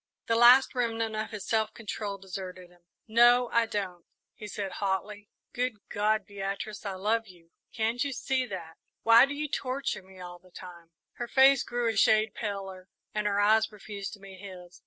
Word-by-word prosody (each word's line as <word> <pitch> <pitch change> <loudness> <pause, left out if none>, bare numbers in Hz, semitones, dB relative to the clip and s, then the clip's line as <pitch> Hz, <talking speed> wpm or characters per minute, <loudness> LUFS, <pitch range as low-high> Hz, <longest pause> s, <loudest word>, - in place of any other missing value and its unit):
The 230 - +1
last 245 +3 +7
remnant 225 -3 -1
of 215 0 -3
his 210 -2 -7
self 220 -1 0
control 210 -2 -5
deserted 185 -1 -8
him. 175 0 -23 0.3
"No, 240 +2 +5
I 235 -1 +3
don't," 190 -5 -4 0.3
he 210 - -9
said, 200 -1 -5
hotly. 200 +1 -2 0.2
"Good 250 0 -1 0.2
God, 210 0 +1
Beatrice, 200 +1 -5
I 195 - -3
love 220 +4 0
you 170 -3 -18 0.2
can't 230 +2 -1
you 280 - -2
see 260 0 -1
that? 170 -6 -8 0.3
Why 230 +3 +7
do 285 - -5
you 300 +1 -3
torture 270 -3 -3
me 190 0 -17
all 175 -1 -9
the 185 +1 -21
time?" 175 -2 -12 0.3
Her 240 - -4
face 270 +1 +5
grew 240 -1 -2
a 225 - 0
shade 215 0 +4
paler, 195 -3 -6 0.3
and 210 0 -1
her 200 0 +1
eyes 220 +2 +4
refused 205 -1 -7
to 210 - -11
meet 195 -1 -12
his. 180 -3 -11
210 Hz, 185 wpm, -28 LUFS, 190-230 Hz, 0.3 s, last